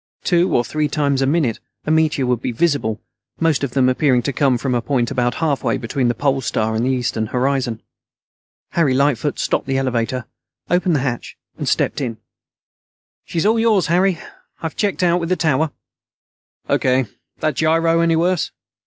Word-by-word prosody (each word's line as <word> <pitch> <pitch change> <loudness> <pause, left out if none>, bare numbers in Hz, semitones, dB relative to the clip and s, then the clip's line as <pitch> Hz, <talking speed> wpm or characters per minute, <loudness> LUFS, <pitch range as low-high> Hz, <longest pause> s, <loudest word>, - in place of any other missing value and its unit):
Two 175 0 +2
or 120 - +2
three 155 +3 -1
times 140 -2 0
a 135 - +2
minute 145 -6 +1 0.3
a 155 - 0
meteor 155 -4 +2
would 125 -2 0
be 125 - -2
visible, 120 -5 0 0.4
most 160 -4 +1
of 130 -3 -2
them 130 -2 +4
appearing 130 -1 +2
to 140 - -2
come 135 -3 +2
from 130 +1 -2
a 120 - +1
point 125 -1 0
about 120 -2 0
halfway 150 -4 0
between 125 +2 -1
the 120 - 0
Pole 135 +2 0
Star 110 -2 -1
and 110 +1 0
the 130 - +1
eastern 120 -4 -1
horizon. 125 -2 -1 0.9
Harry 150 -6 +2
Lightfoot 140 0 +1
stopped - - -1
the 135 0 0
elevator, 125 -1 -1 0.5
opened 180 -1 +2
the 140 - +1
hatch, 130 -3 -4 0.2
and - - -1
stepped - - 0
in. 120 -4 -3 1.1
"She's 165 - -2
all 225 +2 +3
yours, 220 -5 +3
Harry. 180 +1 +2 0.4
I've - - -33
already - - -27
checked 200 -3 0
out 175 0 +3
with 165 -1 -3
the 185 - +2
tower." 160 -2 +1 1.0
"O.K. 130 0 +2 0.3
That 155 -1 0
gyro 165 +1 +3
any 165 -1 +3
worse?" 175 0 +1
140 Hz, 180 wpm, -19 LUFS, 125-165 Hz, 1.1 s, them